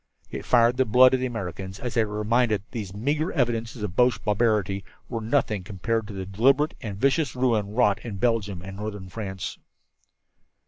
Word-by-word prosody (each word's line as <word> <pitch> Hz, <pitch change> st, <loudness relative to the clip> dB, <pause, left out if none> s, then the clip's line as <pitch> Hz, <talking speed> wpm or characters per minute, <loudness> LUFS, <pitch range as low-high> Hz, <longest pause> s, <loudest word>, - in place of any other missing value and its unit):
It -, -, -6 dB
fired 120 Hz, 0 st, +4 dB
the 130 Hz, -, +3 dB
blood 125 Hz, +3 st, +6 dB
of 130 Hz, -, +3 dB
the 130 Hz, -, 0 dB
Americans 95 Hz, -4 st, -6 dB
as 125 Hz, -, -4 dB
they 115 Hz, -, +3 dB
were 105 Hz, -1 st, -4 dB
reminded 110 Hz, 0 st, +2 dB
that 100 Hz, -, -33 dB
these 105 Hz, -6 st, -5 dB
meagre 145 Hz, -, -1 dB
evidences 115 Hz, -4 st, -1 dB
of 95 Hz, -4 st, -4 dB
Boche 125 Hz, -2 st, +3 dB
barbarity 105 Hz, -2 st, +1 dB, 0.2 s
were 115 Hz, -2 st, -4 dB
as 110 Hz, -, -6 dB
nothing 110 Hz, -8 st, +1 dB
compared 110 Hz, +3 st, -2 dB
to 105 Hz, -, -8 dB
the 95 Hz, -1 st, -4 dB
deliberate 135 Hz, +10 st, +2 dB
and 105 Hz, -5 st, -5 dB
vicious 135 Hz, +2 st, +1 dB
ruin 110 Hz, -5 st, 0 dB
wrought 110 Hz, -5 st, +3 dB
in 115 Hz, -4 st, -5 dB
Belgium 105 Hz, -4 st, 0 dB
and 95 Hz, +1 st, -8 dB
northern 105 Hz, -3 st, -6 dB
France. 95 Hz, -1 st, -5 dB
110 Hz, 190 wpm, -25 LUFS, 100-125 Hz, 0.2 s, blood